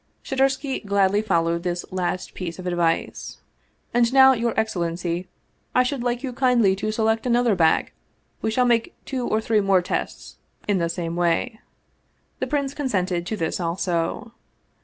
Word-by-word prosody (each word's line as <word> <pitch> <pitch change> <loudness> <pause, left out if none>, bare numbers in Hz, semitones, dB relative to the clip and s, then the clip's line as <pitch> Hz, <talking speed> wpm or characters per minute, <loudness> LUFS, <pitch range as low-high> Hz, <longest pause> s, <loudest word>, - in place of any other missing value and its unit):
Shadursky 270 0 0
gladly 200 0 +2
followed 170 -5 +1
this 175 0 -3
last 185 0 -3
piece 170 -3 -5
of 185 - -8
advice. 175 -2 -1 0.3
" - - -42
And 235 0 +3
now, 265 0 +7
your 235 -2 0
excellency, 175 -4 -2 0.5
I 250 - +5
should 255 0 -2
like 245 +1 -1
you 260 -2 -3
kindly 240 -6 +3
to 215 +2 -2
select 220 +2 0
another 240 -2 +3
bag; 165 -4 +2 0.5
we - - 0
shall 250 +3 +2
make 235 -2 +1
two 255 -3 -3
or 215 - +1
three 220 -1 +1
more 195 -2 +3
tests - - -4 0.3
in 205 -3 +2
the 170 -1 0
same 170 -1 -3
way." 175 +7 0 0.8
The 260 - -2
prince 280 0 -1
consented 185 - -1
to 220 - -3
this 165 -1 -2
also. 175 +5 -2
210 Hz, 160 wpm, -23 LUFS, 175-245 Hz, 0.8 s, now